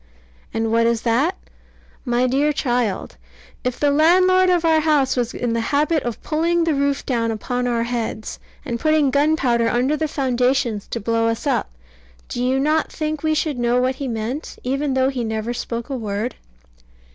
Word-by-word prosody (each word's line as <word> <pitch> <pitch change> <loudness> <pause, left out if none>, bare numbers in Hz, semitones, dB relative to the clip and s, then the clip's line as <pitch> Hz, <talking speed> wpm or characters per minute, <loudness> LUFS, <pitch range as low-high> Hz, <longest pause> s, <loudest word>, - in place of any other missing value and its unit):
And 225 0 -1
what 230 0 +3
is 235 -1 0
that? 260 - +1 0.7
My 245 0 +1
dear 275 +4 +2
child, 240 - -1 0.5
if 250 -1 -2
the 290 -1 +3
landlord 365 +5 +4
of 350 -2 +2
our 320 -1 +4
house 300 -4 +2
was 245 -2 -1
in 240 -2 -2
the 230 - 0
habit 295 +5 +1
of 240 -2 -5
pulling 335 +2 +1
the 325 -1 +1
roof 280 0 0
down 230 -3 0
upon 245 +3 -2
our 235 -1 0
heads, 235 -2 -4 0.3
and 235 -4 -3
putting 310 -2 +2
gunpowder 280 -5 +2
under 255 +5 +1
the 315 0 -1
foundations 255 -5 0
to - - -4
blow 230 +2 0
us 230 +5 -2
up, 275 -3 0 0.6
do 245 - -3
you 260 +1 +1
not 305 +3 +1
think 310 -1 -3
we 315 -1 +1
should 300 -4 -1
know 240 +1 +2
what 255 +1 0
he 275 - -4
meant, 235 +5 -4
even 275 +2 -1
though 260 0 +3
he 255 -3 -3
never 220 +1 -2
spoke 235 -1 -4
a - - -1
word? 215 0 -3
255 Hz, 180 wpm, -21 LUFS, 235-300 Hz, 0.7 s, landlord